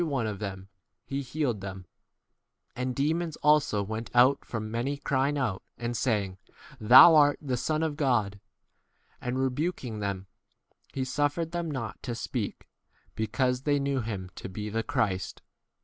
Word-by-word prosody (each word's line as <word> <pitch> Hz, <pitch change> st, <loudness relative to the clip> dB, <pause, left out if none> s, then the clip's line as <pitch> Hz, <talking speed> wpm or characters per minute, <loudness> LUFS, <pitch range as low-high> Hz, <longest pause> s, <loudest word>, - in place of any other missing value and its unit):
41 170 Hz, -, 0 dB
one 130 Hz, -5 st, 0 dB
of 105 Hz, -3 st, -4 dB
them 95 Hz, -2 st, -6 dB, 0.4 s
he 140 Hz, 0 st, -3 dB
healed 130 Hz, -5 st, -2 dB
them; 95 Hz, -1 st, -7 dB, 0.9 s
and 125 Hz, 0 st, -2 dB
demons 160 Hz, +4 st, 0 dB
also 150 Hz, -9 st, +3 dB
went 110 Hz, +3 st, -5 dB
out 125 Hz, +3 st, +5 dB
from 110 Hz, -2 st, -5 dB
many, 125 Hz, +5 st, -1 dB
crying 140 Hz, +1 st, 0 dB
out 115 Hz, -9 st, -1 dB, 0.2 s
and 120 Hz, 0 st, -3 dB
saying, 100 Hz, -7 st, -1 dB, 0.4 s
Thou 125 Hz, +9 st, +9 dB
art 145 Hz, -2 st, +5 dB
1 150 Hz, -, -13 dB
the 125 Hz, -, +2 dB
Son 155 Hz, +5 st, 0 dB
of 155 Hz, -2 st, -1 dB
God. 115 Hz, -9 st, +1 dB, 0.8 s
And 125 Hz, +1 st, -2 dB
rebuking 130 Hz, -3 st, -2 dB
them, 100 Hz, -2 st, -3 dB, 0.7 s
he 135 Hz, -, -2 dB
suffered 145 Hz, +5 st, -1 dB
them 170 Hz, -1 st, -2 dB
not 130 Hz, -7 st, -5 dB
to 120 Hz, -2 st, -4 dB
speak, 115 Hz, -, -4 dB, 0.5 s
because 125 Hz, +3 st, 0 dB
they 145 Hz, +1 st, +2 dB
knew 140 Hz, -1 st, 0 dB
him 100 Hz, -5 st, -5 dB
to -, -, -6 dB
be 105 Hz, +3 st, -5 dB
the 115 Hz, +1 st, 0 dB
Christ. 110 Hz, -8 st, -2 dB
125 Hz, 160 wpm, -28 LUFS, 110-145 Hz, 0.9 s, Thou